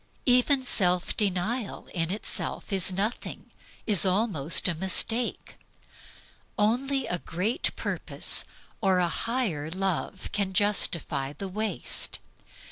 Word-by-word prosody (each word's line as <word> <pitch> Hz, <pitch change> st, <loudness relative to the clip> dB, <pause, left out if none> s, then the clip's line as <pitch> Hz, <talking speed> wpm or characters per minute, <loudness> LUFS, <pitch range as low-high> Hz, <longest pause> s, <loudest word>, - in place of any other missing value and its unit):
Even 260 Hz, +2 st, +3 dB
self 180 Hz, -6 st, +2 dB
denial 205 Hz, +3 st, -1 dB
in 165 Hz, -2 st, -1 dB
itself 205 Hz, +1 st, -2 dB
is 190 Hz, -1 st, +3 dB
nothing, 205 Hz, +6 st, -4 dB, 0.3 s
is 205 Hz, -5 st, +6 dB
almost 185 Hz, -6 st, +2 dB
a 175 Hz, -, +1 dB
mistake. 190 Hz, +7 st, 0 dB, 1.0 s
Only 255 Hz, +6 st, +1 dB
a 175 Hz, -, -3 dB
great 185 Hz, +10 st, 0 dB
purpose -, -, 0 dB, 0.4 s
or 190 Hz, -3 st, +3 dB
a 175 Hz, -2 st, +1 dB
mightier 205 Hz, -, -1 dB
love 190 Hz, 0 st, -3 dB
can 200 Hz, -2 st, -1 dB
justify 170 Hz, -8 st, +1 dB
the 195 Hz, +7 st, -6 dB
waste. 215 Hz, +3 st, -2 dB
195 Hz, 110 wpm, -27 LUFS, 180-225 Hz, 1.0 s, is